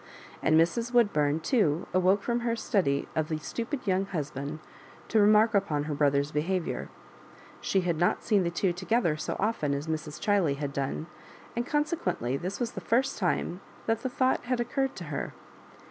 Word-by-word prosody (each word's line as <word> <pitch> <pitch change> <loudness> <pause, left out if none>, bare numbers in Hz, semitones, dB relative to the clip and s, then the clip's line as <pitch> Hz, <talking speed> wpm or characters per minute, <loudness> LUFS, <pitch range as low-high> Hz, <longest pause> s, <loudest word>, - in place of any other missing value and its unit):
And 155 0 +4
Mrs. 230 +9 +1
Woodbum 155 -9 +3
too 175 - +2
awoke 185 +2 +3
from 240 0 0
her 235 -1 0
study 180 - 0
of 155 -1 0
the 155 - -1
stupid 235 - -4
young 190 0 +1
husband 150 -4 -4 0.5
to 220 - +3
remark 215 +2 +5
upon 160 -8 +1
her 150 0 -3
brother's 140 0 +2
behavrour: 170 +4 -1 0.7
she 190 - +1
had 175 -3 0
not 175 - +2
seen 210 -4 +3
the 170 - 0
two 175 +1 0
together 185 -1 +1
so 155 - -3
often 190 -9 0
as 140 +1 -3
Mns. 155 -2 -4
Chiley 195 -9 +2
had 140 -1 -3
done, 140 +3 -2 0.5
and 235 +1 -1
consequently 295 - 0
this 185 +7 -4
was 240 -2 -1
the - - -6
first* 250 +2 +1
time 180 -1 -1 0.2
that 225 0 0
the 260 - -2
thought 255 0 +1
had 250 0 0
occurred 265 +3 -1
to 180 - -7
her. - - -3
185 Hz, 175 wpm, -28 LUFS, 150-230 Hz, 0.7 s, remark